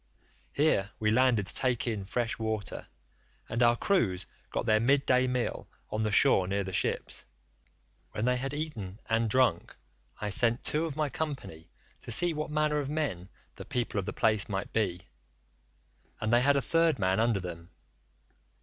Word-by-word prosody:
Here 140 -9 +2
we 105 -1 +1
landed 120 -3 +3
to - - 0
take 125 -3 +1
in 110 -5 -3
fresh 115 +3 -2
water, 110 -2 -3 0.6
and 115 - -2
our 120 0 +5
crews 105 - +1 0.2
got - - -2
their 110 0 +4
mid 135 +4 +2
day 130 0 +3
meal 125 -1 -2 0.2
on 110 - -1
the 105 -1 0
shore 95 -1 +5
near 100 +1 -1
the 95 -1 -6
ships. 95 - -1 0.9
When 105 - -3
they 125 0 +2
had 135 +2 -3
eaten 130 -11 -5
and 115 0 +1
drunk 125 -8 +1 0.4
I 105 -1 -3
sent 120 +3 +2
two 155 +2 0
of 150 - -6
my 155 -1 0
company 130 - -5 0.3
to - - -8
see 175 -1 +3
what 155 0 -4
manner 150 0 +1
of 140 -2 -3
men 115 - -3 0.3
the - - -7
people 120 -4 -2
of 95 - -4
the - - -1
place 110 -3 +1
might 95 -1 -4
be, 95 -6 0 1.2
and 110 +2 -1
they 120 - +5
had 140 +2 +4
a 140 - +1
third 165 -3 +2
man 95 -1 +1
under 115 -3 +2
them. 85 -1 -8
115 Hz, 175 wpm, -29 LUFS, 100-140 Hz, 1.2 s, our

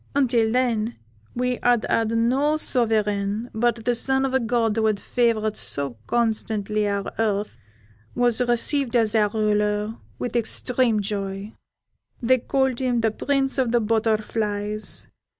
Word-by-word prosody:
Until 240 -5 +2
then 235 -2 0 0.4
we 250 0 -1
had 240 -2 +3
had 225 -1 +1
no 255 +7 +2
sovereign, 215 -4 0
but 230 0 0
the 245 - +3
son 265 +3 +1
of 265 - -2
a 265 - +3
god 230 -2 0
who 220 -1 +3
favoured 220 0 0
so 140 -3 -2
constantly 215 -2 0
our 200 -1 -2
earth 210 - -1 0.6
was 245 -1 +2
received 245 +2 +1
as 225 -3 +2
our 210 -2 +3
ruler 210 0 0 0.2
with 245 - -4
extreme 235 -1 +1
joy; 200 0 -4 0.7
they 255 +2 +3
called 265 0 0
him 250 -3 +1
the 225 -1 +2
Prince 270 +3 0
of 250 -3 +1
the 240 - +3
Butterflies. 215 -1 -1
225 Hz, 135 wpm, -23 LUFS, 210-245 Hz, 0.7 s, had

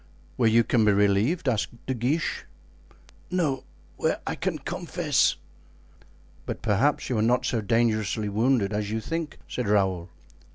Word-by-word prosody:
"Where 115 -3 +3
you 115 +1 +5
can 115 0 +2
be 105 -1 +4
relieved?" 105 - +2
asked 120 0 -1
De 130 - -1
Guiche. 135 +6 -1 0.8
"No, 165 -7 0 0.3
where - - 0
I - - -2
can - - -2
confess." - - 0 1.1
"But - - -5
perhaps 130 +9 +2
you 120 -4 0
are - - +2
not 125 +3 +2
so 120 -3 0
dangerously 110 0 +1
wounded 110 0 +1
as 105 0 -2
you 110 +1 -1
think," 165 +5 -4
said 125 -4 -3
Raoul. 95 -4 +1
115 Hz, 150 wpm, -26 LUFS, 105-130 Hz, 1.1 s, you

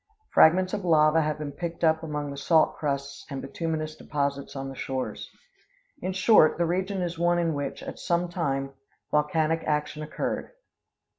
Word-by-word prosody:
Fragments 185 +3 +5
of 200 - -2
lava 160 -2 +4
have 155 0 -1
been 150 -1 -5
picked 170 +3 -6
up 160 -1 +4
among 150 -3 -4
the - - -6
salt 160 +3 +3
crusts 140 -1 -3
and 135 -2 -4
bituminous 155 +2 -3
deposits 140 -2 -3
on 135 0 -4
the 135 - -7
shores. 130 0 -4 0.7
In 185 - -2
short, 190 -3 +5
the 170 - +2
region 185 +2 -1
is 170 -1 -4
one 175 0 +3
in 170 -2 +1
which, 145 -1 -4
at - - -7
some 175 0 0
time, 135 -6 -2 0.4
volcanic 155 +2 +1
action 150 0 -1
occurred. 155 - -4
155 Hz, 165 wpm, -27 LUFS, 145-170 Hz, 0.7 s, Fragments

